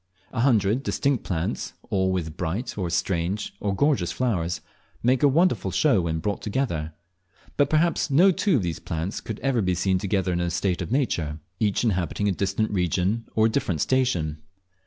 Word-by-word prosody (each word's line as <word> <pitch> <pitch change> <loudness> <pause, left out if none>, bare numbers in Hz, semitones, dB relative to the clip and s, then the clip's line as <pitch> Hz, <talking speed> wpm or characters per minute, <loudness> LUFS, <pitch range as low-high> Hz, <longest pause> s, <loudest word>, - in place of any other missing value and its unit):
A 120 - -3
hundred 115 -2 +3
distinct 140 -3 0
plants, 85 -2 -3 0.2
all 95 -1 +2
with 80 -4 -2
bright, 90 +9 -3
or 90 -4 -2
strange, 90 +3 -1
or 100 -1 -1
gorgeous 135 - +2
flowers, 90 -9 -1 0.4
make 125 +2 +3
a 145 - +6
wonderful 170 +6 +2
show 135 -11 +3
when 80 -1 -1
brought 100 +5 -2
together; 95 - -2 0.6
but 145 -1 +3
perhaps 160 +1 +2
no 175 +8 +6
two 185 0 +1
of 115 - +1
these 85 -1 -3
plants 85 +2 -4
could 110 -1 -6
ever 130 -2 +1
be 90 -2 +1
seen 95 +1 +1
together 95 -1 0
in 85 - 0
a 85 - 0
state 90 +1 -1
of - - -5
nature, 85 - 0 0.2
each 105 -1 +1
inhabiting 100 -2 0
a - - +3
distant 100 +3 -1
region 95 +4 0
or 110 - +4
a - - +4
different 100 - -1
station. 85 - 0
100 Hz, 180 wpm, -25 LUFS, 85-125 Hz, 0.6 s, a